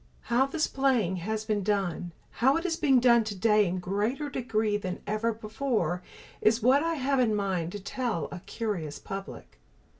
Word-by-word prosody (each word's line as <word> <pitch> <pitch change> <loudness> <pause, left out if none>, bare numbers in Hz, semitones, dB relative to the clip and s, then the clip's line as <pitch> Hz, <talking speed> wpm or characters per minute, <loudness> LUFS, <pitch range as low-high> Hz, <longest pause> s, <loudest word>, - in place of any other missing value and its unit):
How 260 +3 +4
this 305 +3 0
playing 245 -9 +1
has 215 +5 -3
been 215 -2 0
done, 190 -4 -1 0.3
how 270 +5 +5
it 330 - -4
is 335 -3 +1
being 285 -6 +4
done 235 -1 +5
today 210 0 +2
in 180 +2 -2
greater 210 +11 -2
degree 220 -5 0
than 185 -3 -3
ever 215 +3 0
before, 215 - -2 0.4
is 220 +1 +3
what 265 +4 +5
I 330 0 0
have 275 -1 +1
in 225 -4 +3
mind 185 -5 -1
to 205 - -5
tell 205 - -2
a 180 - -6
curious 175 -7 -4
public. 195 0 -8
215 Hz, 175 wpm, -28 LUFS, 195-255 Hz, 0.4 s, how